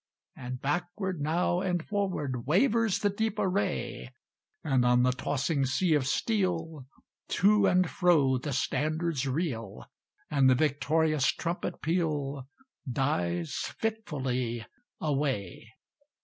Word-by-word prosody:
And 125 Hz, 0 st, -6 dB
backward 175 Hz, +4 st, -2 dB
now 175 Hz, +4 st, +1 dB
and 180 Hz, -3 st, -1 dB
forward 150 Hz, -, -2 dB
Wavers 220 Hz, -, +3 dB
the 205 Hz, -, +2 dB
deep 220 Hz, +1 st, -2 dB
array; 190 Hz, -, -1 dB, 0.5 s
And 135 Hz, -5 st, +2 dB
on 125 Hz, 0 st, +4 dB
the 125 Hz, -, +4 dB
tossing 140 Hz, +3 st, -1 dB
sea 160 Hz, +6 st, +2 dB
of 140 Hz, -4 st, +2 dB
steel, 165 Hz, -, -1 dB, 0.4 s
To 205 Hz, +1 st, +4 dB
and 185 Hz, -1 st, +3 dB
fro 145 Hz, -8 st, +3 dB
the 145 Hz, +3 st, -4 dB
standards 155 Hz, +2 st, -1 dB
reel; 130 Hz, -, -3 dB, 0.5 s
And 140 Hz, -3 st, +4 dB
the 130 Hz, -, +5 dB
victorious 155 Hz, +1 st, +2 dB
trumpet 170 Hz, +1 st, -4 dB
peal 150 Hz, -5 st, -1 dB, 0.4 s
Dies 90 Hz, -, -1 dB, 0.2 s
fitfully 130 Hz, -, -2 dB, 0.3 s
away. 135 Hz, -, -2 dB
150 Hz, 110 wpm, -29 LUFS, 130-180 Hz, 0.5 s, the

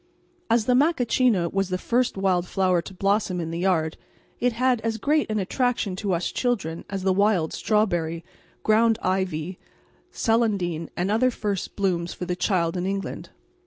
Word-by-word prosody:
As 230 Hz, -1 st, +3 dB
the 250 Hz, -, +3 dB
macachina 250 Hz, -, +3 dB
was 195 Hz, -1 st, 0 dB
the 185 Hz, -, -1 dB
first 240 Hz, +3 st, 0 dB
wild 185 Hz, -2 st, +1 dB
flower 185 Hz, -2 st, +2 dB
to 190 Hz, -, -10 dB
blossom 195 Hz, -1 st, +1 dB
in 165 Hz, -1 st, -3 dB
the 170 Hz, +2 st, -2 dB
land 160 Hz, -4 st, +1 dB, 0.4 s
it 245 Hz, 0 st, +1 dB
had 250 Hz, 0 st, +1 dB
as 225 Hz, 0 st, -1 dB
great 295 Hz, +5 st, +1 dB
an 215 Hz, -, -1 dB
attraction 220 Hz, 0 st, 0 dB
to 195 Hz, -1 st, -1 dB
us 170 Hz, 0 st, -1 dB
children 200 Hz, -10 st, -1 dB
as 195 Hz, -1 st, -4 dB
the 190 Hz, 0 st, +3 dB
wild 195 Hz, -4 st, +2 dB
strawberry, 175 Hz, -6 st, 0 dB, 0.4 s
ground 225 Hz, +1 st, +4 dB
ivy, 185 Hz, -2 st, -1 dB, 0.5 s
celandine, 200 Hz, -8 st, 0 dB
and 180 Hz, +3 st, 0 dB
other 240 Hz, +4 st, +3 dB
first 205 Hz, -6 st, -3 dB
blooms 180 Hz, -4 st, -1 dB
for 180 Hz, -, -5 dB
the 180 Hz, 0 st, -2 dB
child 175 Hz, -2 st, 0 dB
in 180 Hz, +1 st, -2 dB
England. 195 Hz, 0 st, -4 dB
195 Hz, 165 wpm, -25 LUFS, 180-225 Hz, 0.5 s, ground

